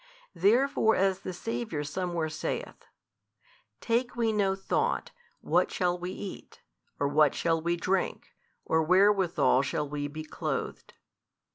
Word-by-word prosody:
Therefore 220 +5 +3
as 190 0 +1
the 185 - -6
Saviour 185 -4 -4
somewhere 170 +1 -2
saith, 155 - -5 0.9
Take 240 +2 0
we 230 -2 +1
no 195 -2 +1
thought, 195 - -1 0.3
what - - +2
shall 180 -1 0
we 180 0 -5
eat? 190 +1 -8 0.4
or, 140 - +2
what 150 0 +3
shall 165 -1 +1
we 170 +1 0
drink? 185 +2 -1 0.4
or, 160 - +2
wherewithal 185 -6 +4
shall 150 +2 -2
we 145 0 -3
be 155 +2 -7
clothed? 155 - -5
180 Hz, 130 wpm, -29 LUFS, 155-200 Hz, 0.9 s, wherewithal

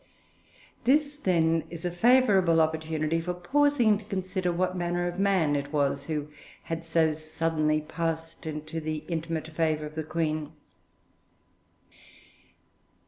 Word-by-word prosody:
This, 290 +3 +3
then, 165 - +2
is 170 +1 -7
a 175 - 0
favourable 195 -5 +4
opportunity 160 0 0
for 180 +1 -3
pausing 240 +2 +3
to - - -13
consider 185 -2 -2
what 185 +1 0
manner 175 0 -1
of 175 +1 -4
man 190 -7 +2
it 145 0 -3
was 140 -2 0
who 150 -2 -2 0.4
had 165 0 -4
so 160 -1 +2
suddenly 155 0 0
passed 165 0 -4
into 155 +1 -5
the 155 0 -3
intimate 160 -1 -3
favour 155 -1 0
of 150 - -8
the 160 0 -3
Queen. 155 -1 -2
165 Hz, 130 wpm, -28 LUFS, 155-180 Hz, 0.4 s, favourable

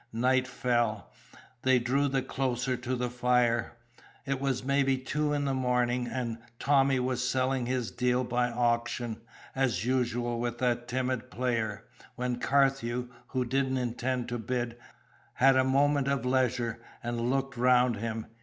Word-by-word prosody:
Night 130 +2 +2
fell: 120 -6 -1 0.5
they 130 -1 +4
drew 130 +4 +1
the 135 -1 0
closer 130 -1 -1
to 125 +1 -3
the 125 -1 -2
fire. 120 -2 +2 0.5
It 135 -1 -2
was 135 -2 -1
maybe 135 0 +2
two 145 +3 -1
in 145 -1 0
the 135 - 0
morning, 125 -1 +1
and 120 -3 -3 0.2
Tommy 135 -1 +3
was 125 -1 -1
selling 130 -1 0
his 125 -3 -1
deal 125 +1 +1
by 125 0 0
auction, 120 -1 -1 0.3
as 120 -7 0
usual 120 -2 0
with 120 0 -2
that 120 -1 0
timid 130 0 -2
player; 115 -1 -2 0.3
when 125 -1 -2
Carthew, 130 -3 +1 0.2
who 130 -1 -1
didn't 130 +1 0
intend 125 0 -2
to 120 0 -3
bid, 120 +1 -2 0.6
had 135 +1 +5
a 130 - +4
moment 140 +1 +2
of 140 -3 0
leisure 125 -2 +1 0.2
and 120 0 -1
looked 135 0 -1
round 125 -1 +4
him. 115 +1 -3
125 Hz, 150 wpm, -29 LUFS, 120-130 Hz, 0.6 s, had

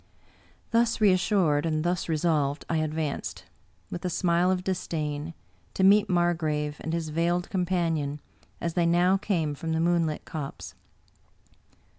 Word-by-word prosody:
Thus 230 0 +2
reassured 185 -6 +3
and 155 -2 0
thus 175 0 -1
resolved, 155 -3 0
I 165 - 0
advanced, 155 -1 -3 0.5
with 175 - -5
a 180 - -1
smile 175 0 +2
of 185 -1 0
disdain, 160 -4 -3 0.4
to 190 - +1
meet 200 +2 +5
Margrave 160 -4 0
and 160 - -4
his 165 -1 -2
veiled 170 +3 0
com 180 -2 0
panion, 165 -5 0 0.4
as 170 -1 -2
they 170 -1 +2
now 175 +3 +4
came 170 -7 -1
from 160 +3 -4
the 160 - 0
moonlit 165 -2 +1
copse. 150 -4 -6
170 Hz, 140 wpm, -27 LUFS, 155-180 Hz, 0.5 s, meet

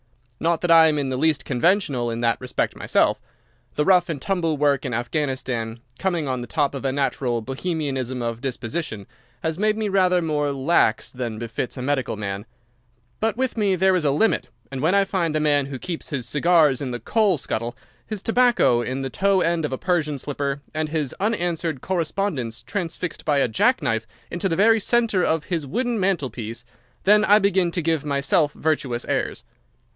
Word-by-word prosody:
Not 165 0 +1
that 175 - +1
I 165 -1 +8
am 155 -1 +1
in 140 -2 -1
the 130 - -2
least 150 -1 +1
conventional 140 - +1
in 115 0 -3
that 115 +1 +1
respect 125 - -2
myself. - - +1 0.5
The 150 - +1
rough 180 -2 +4
and 155 -4 -3
tumble 165 -1 -1
work 140 -2 +2
in 125 -4 -2
Afghanistan, 120 -3 -2 0.2
coming 175 -6 -1
on 130 -2 -2
the 120 - -6
top 145 +1 0
of 140 - -5
a 135 - 0
natural 130 -3 -1
Bohemianism 135 -2 -3
of 115 0 -3
disposition, 130 -3 -4 0.4
has 160 +1 -2
made 215 +1 +2
me 220 -1 -1
rather 185 -2 +3
more 150 -3 0
lax 135 -4 +1
than 120 -4 -4
befits 115 +3 -4
a 125 - -4
medical 135 -4 -1
man. 100 +1 -5 0.7
But 225 0 0
with 260 -1 -1
me 205 -4 +2
there 190 +1 +3
is 180 - 0
a 145 - +3
limit, 155 +11 +2 0.2
and 135 -1 -4
when 165 +6 +3
I 200 0 +4
find 175 -5 -1
a - - +2
man 145 -2 +2
who 135 -1 -5
keeps 170 +5 -6
his 135 -6 -3
cigars 150 -2 +3
in 135 - -3
the 120 -1 -4
coal 210 - +2
scuttle, 120 -1 -4 0.3
his 215 -3 -6
tobacco 240 - +3
in 130 +3 -3
the 135 -1 -4
toe 195 +3 +2
end 165 -2 +1
of 150 - -3
a 130 - -2
Persian 155 -5 0
slipper, 140 0 -3
and 155 0 -2
his 150 -5 -1
unanswered 175 - -1
correspondence 165 - -2
transfixed 180 -3 -4
by 150 -2 +1
a 140 - +3
jack 110 - +2
knife 115 0 -1 0.2
into 175 +3 -1
the 165 - 0
very 225 +4 +5
centre 225 -4 +2
of 160 -2 +1
his 165 -5 -3
wooden 240 - -1
mantelpiece, 125 - -2 0.4
then 210 +2 +5
I 210 -1 +6
begin 190 -3 +2
to 170 - -1
give 160 -2 0
myself 145 +1 +1
virtuous 135 -6 -1
airs. 130 -4 -2
150 Hz, 190 wpm, -23 LUFS, 130-180 Hz, 0.7 s, I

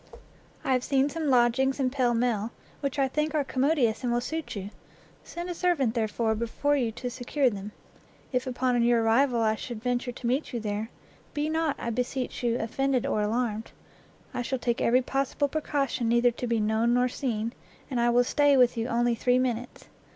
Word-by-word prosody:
I 265 - +1
have 255 -1 +1
seen 275 +1 +2
some 315 -1 -2
lodgings 260 +2 +3
in 255 -2 +1
Pall 250 -3 +1
Mall, 230 -2 0 0.3
which 280 0 -3
I 270 -1 +3
think 300 +3 -1
are 295 - +2
commodious 265 -4 +1
and 245 - 0
will 240 - +2
suit 315 +4 -4
you; 200 0 -5 0.5
send 345 +1 -6
a 355 - -3
servant, 335 -10 +1
therefore, 220 -1 0
before 235 +6 0
you 245 -5 0
to 245 +2 -4
secure 255 +2 0
them. 205 0 -6 0.6
If 255 0 -1
upon 250 -1 +1
your 235 -1 +3
arrival 235 +2 +3
I 220 -1 +3
should 220 0 -7
venture 245 0 -1
to 245 - -10
meet 255 +5 0
you 240 - -1
there, 210 0 -3 0.5
be 295 +1 0
not, 320 -2 0
I 235 - -3
beseech 250 +2 -3
you, 240 -1 +1
offended 260 +3 0
or 210 - 0
alarmed; 220 0 -1 0.6
I - - -2
shall 260 +2 -2
take 240 -1 -1
every 250 +2 +3
possible 275 +2 0
precaution 275 -5 -1
neither 240 +1 +4
to 245 +1 -5
be 230 -1 +1
known 220 +3 +2
nor 250 0 +3
seen, 235 -3 -2 0.4
and 250 - 0
I 240 - +3
will 245 +1 +4
stay 285 +2 +3
with 250 -1 +4
you 230 +1 -1
only 240 0 +2
three 245 +2 +2
minutes. 245 -1 -2
245 Hz, 195 wpm, -27 LUFS, 235-270 Hz, 0.6 s, neither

